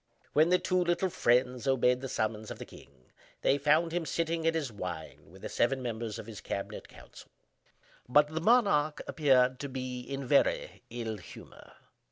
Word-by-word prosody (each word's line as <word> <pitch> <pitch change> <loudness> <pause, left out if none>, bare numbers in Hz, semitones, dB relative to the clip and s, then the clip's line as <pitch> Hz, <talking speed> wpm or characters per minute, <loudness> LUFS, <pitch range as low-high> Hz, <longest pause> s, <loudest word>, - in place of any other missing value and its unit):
When 155 +3 +4
the 180 - +5
two 185 0 +1
little 175 +1 0
friends 125 0 +1
obeyed 125 -1 +3
the 135 - -5
summons 110 -1 -2
of - - -6
the - - -8
king 65 -2 -17 0.3
they 140 - +3
found 155 +4 +3
him 175 0 -1
sitting 165 0 -1
at 165 - +2
his 145 -6 -2
wine 90 -6 -7
with - - -16
the - - -3
seven 130 +3 +1
members 115 -3 -4
of - - -8
his 105 -3 -9
cabinet 100 - -5
council; - - -15 0.8
but 150 +3 +5
the 160 +1 -3
monarch 190 -9 +3
appeared 130 -4 +3
to 140 - -5
be 130 -1 -4
in 135 +2 -5
a - - -7
very - - +1
ill 115 -2 -4
humor. 90 - -13
135 Hz, 185 wpm, -30 LUFS, 120-160 Hz, 0.8 s, the